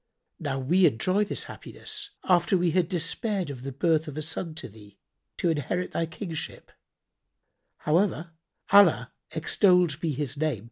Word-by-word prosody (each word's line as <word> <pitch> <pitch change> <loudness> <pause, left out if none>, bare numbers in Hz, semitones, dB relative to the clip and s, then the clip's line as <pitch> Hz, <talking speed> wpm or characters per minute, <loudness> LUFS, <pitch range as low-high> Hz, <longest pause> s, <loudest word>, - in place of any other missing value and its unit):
Now 145 -5 -2
we 170 +8 +4
enjoy 185 - +1
this - - -4
happiness, 410 - -6
after 180 +1 +3
we 175 -1 +2
had 175 0 +1
despaired 180 0 -1
of 130 -3 -8
the 135 +1 -5
birth 155 +3 +1
of 150 -1 -7
a 155 - -1
son 160 +1 -3
to 160 - -6
thee, 105 -2 -16 0.4
to 170 - +1
inherit 165 +4 -2
thy 165 - -1
kingship; 165 -1 -6 1.1
however, 170 0 +1 0.4
Allah 180 -11 +6 0.2
(extolled 170 0 +3
be 165 - 0
His 145 0 -3
name!) 150 -6 0
165 Hz, 150 wpm, -27 LUFS, 145-180 Hz, 1.1 s, Allah